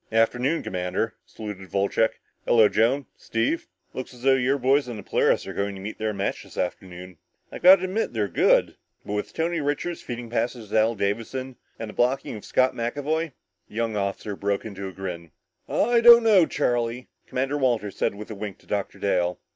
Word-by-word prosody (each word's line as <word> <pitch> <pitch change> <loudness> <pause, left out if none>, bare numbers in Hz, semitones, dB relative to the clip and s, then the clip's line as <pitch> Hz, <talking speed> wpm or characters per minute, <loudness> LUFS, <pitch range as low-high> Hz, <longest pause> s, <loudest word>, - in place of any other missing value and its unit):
"Afternoon, 125 +7 +2
Commander," 90 +5 -2
saluted 105 -4 -8
Wolcheck. 100 +3 +1 0.3
"Hello, 110 -3 +6
Joan, 130 +7 +2
Steve. 115 +9 -1 0.3
Looks 130 0 -6
as 120 - -15
though 135 0 +5
your 130 +1 +2
boys 135 0 +2
on 120 - -5
the 105 - -8
Polaris - - +2
are - - -6
going 100 0 -2
to - - -8
meet 105 +3 -7
their 110 0 0
match 100 -1 -2
this - - -15
afternoon. 90 -1 -5 0.3
I've - - -8
got 185 +2 +10
to 185 - -7
admit 190 +4 -1
they're 105 -3 0
good, 90 - +3 0.3
but 105 - -4
with 105 - -3
Tony 165 0 -1
Richards 145 +4 -2
feeding 120 -1 -7
passes 120 -2 -2
to 110 - +4
Al 115 +2 +2
Davison 115 +6 -3 0.2
and 115 - -5
with - - -9
the - - -9
blocking 130 0 0
of 105 - -9
Scott 130 0 +2
McAvoy 145 +6 -2 0.2
" 90 -2 -48
The - - -15
young 115 -1 -1
officer 100 0 -2
broke 100 0 -1
off 105 -3 -7
with - - -11
a 95 - -4
grin. 90 -3 -6 0.4
"I 235 +1 +3
don't 235 0 +9
know, 200 -7 +5
Charlie," 120 -2 -1 0.2
Commander 135 +3 -1
Walters 115 -7 0
said - - 0
with 105 +2 -8
a - - -5
wink 100 -1 -6
to - - -24
Dr. 100 -1 -3
Dale. 90 -3 0
115 Hz, 205 wpm, -25 LUFS, 100-135 Hz, 0.4 s, got